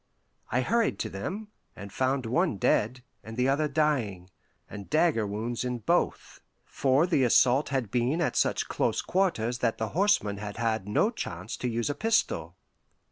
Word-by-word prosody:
I 125 - +2
hurried 230 - +1
to 110 - -4
them, 195 - -5 0.3
and 100 -1 -9
found 130 0 0
one 155 - +1
dead, 120 +6 +1 0.2
and 110 +1 -9
the 125 +1 +2
other 145 +3 +2
dying, 130 - -1 0.4
and 100 -2 -9
dagger 155 -9 +2
wounds 110 +4 -3
in 125 -1 -2
both, 115 - -1 0.2
for 135 +4 +2
the 165 -7 +2
assault 130 +3 +4
had 130 -7 -2
been 125 +6 +1
at 170 - 0
such - - +1
close - - 0
quarters 125 - 0
that 115 -2 0
the 110 -1 -2
horseman 170 - +1
had 105 0 -6
had 110 -3 -1
no 155 - +2
chance 130 - -6
to 125 - -2
use 120 +4 -1
a - - -2
pistol. 140 - 0
125 Hz, 170 wpm, -28 LUFS, 110-150 Hz, 0.4 s, assault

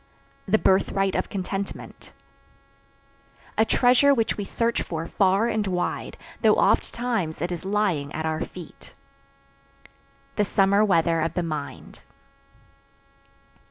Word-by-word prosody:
The 205 +3 +4
birthright 195 0 +2
of - - -1
contentment. 195 0 -6 1.4
A 220 - +4
treasure 255 +4 +4
which 225 -3 0
we 205 - -4
search 230 +4 -1
for 165 -1 -4
far 195 +4 +2
and 220 -3 -1
wide, 180 -1 -3 0.2
though - - +5
oft - - +2
times 225 -10 -2
it 175 +3 -2
is 175 0 -5
lying 190 -8 0
at 160 +1 -4
our 160 +1 -2
feet. 175 -4 -9 1.4
The 210 - +3
summer 200 +1 +3
weather 170 -4 +2
of 165 - -2
the 180 - 0
mind. 155 -3 -6
195 Hz, 125 wpm, -24 LUFS, 165-215 Hz, 1.4 s, though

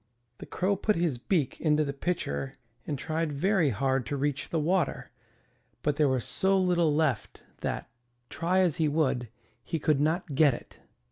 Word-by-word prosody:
The - - -9
Crow 195 +2 0
put 215 +2 +1
his 165 -7 0
beak 150 -1 -1
into 155 -1 +3
the 140 - -3
pitcher 135 - -3 0.3
and 145 - -2
tried 160 +2 -2
very 170 +2 +2
hard 135 +2 0
to 145 - -2
reach 140 0 -2
the 165 - 0
water, 170 0 0 0.7
but 150 -1 +1
there 150 -2 +4
was 130 -2 0
so 190 +10 +2
little 175 -4 +3
left 150 -7 -1 0.2
that, - - -3 0.4
try 175 +8 +1
as 175 -6 +2
he 160 - +2
would, 140 -6 0 0.3
he 165 - -2
could 150 -2 +2
not 160 0 0
get 140 -2 +5
it. - - -13
155 Hz, 175 wpm, -28 LUFS, 135-175 Hz, 0.7 s, get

